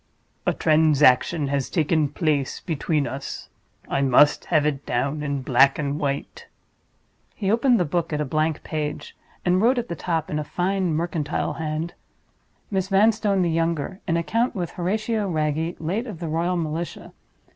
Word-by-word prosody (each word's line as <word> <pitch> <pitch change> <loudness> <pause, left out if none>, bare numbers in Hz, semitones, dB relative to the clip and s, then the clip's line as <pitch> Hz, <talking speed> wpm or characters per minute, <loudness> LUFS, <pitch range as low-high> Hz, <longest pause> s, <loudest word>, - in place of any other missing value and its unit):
"A - - +3
transaction 150 -1 +3
has 140 -2 -1
taken 155 -3 +1
place 150 -3 -1
between 155 -2 -1
us. 135 0 -6 0.4
I 135 - 0
must 140 +2 +4
have 155 -4 +2
it 145 -2 -1
down 140 +5 -1
in 140 -2 -2
black 135 +2 +4
and 145 -1 -2
white." 145 - -3 0.9
He 200 -2 -1
opened 240 +2 +3
the 175 - +2
book 165 +2 -1
at 150 - -1
a 150 - 0
blank 155 +2 -1
page, 150 -2 -4 0.3
and 180 +1 +3
wrote 245 +4 +4
at 240 -1 -2
the 170 - -3
top, 165 -1 -2
in 150 - -1
a - - -2
fine 180 +1 -1
mercantile 160 -2 -2
hand: 160 +2 -3 0.8
"_Miss 190 -1 0
Vanstone, 205 -1 +3
the 170 - +1
Younger: 165 +2 -1
In 165 -1 +1
account 225 +10 0
with 175 -3 -3
Horatio 210 +3 -1
Wragge, 160 +1 -1
late 195 +10 -2
of 210 -6 -6
the 170 0 -5
Royal 170 +3 0
Militia. 165 +1 -4
160 Hz, 165 wpm, -24 LUFS, 150-185 Hz, 0.9 s, must